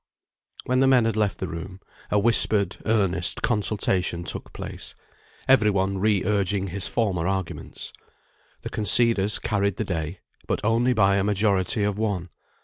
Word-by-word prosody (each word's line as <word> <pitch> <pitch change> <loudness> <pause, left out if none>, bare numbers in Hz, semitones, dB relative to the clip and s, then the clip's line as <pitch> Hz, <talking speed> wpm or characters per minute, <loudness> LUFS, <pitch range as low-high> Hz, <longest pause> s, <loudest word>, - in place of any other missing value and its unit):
When 125 0 +1
the 135 - +4
men 125 -3 +4
had 115 -1 0
left 105 -2 0
the 95 - -4
room, 90 +3 -7 0.3
a 105 - +1
whispered 105 -1 +3
earnest 100 -4 +1
consultation 95 -5 0
took - - -5
place, - - -6 0.5
every 130 -5 +5
one 95 -1 0
re 105 -1 +2
urging 100 -1 0
his 95 0 -2
former 95 -7 -1
arguments. 95 -3 -5 0.7
The - - -6
conceders 110 -1 +3
carried 100 -2 -1
the - - -2
day, 85 -1 -4 0.3
but - - -1
only 115 +3 +2
by 100 -3 +3
a 100 - +1
majority 100 0 +1
of 105 0 -1
one. 100 -5 -2
100 Hz, 150 wpm, -24 LUFS, 95-110 Hz, 0.7 s, every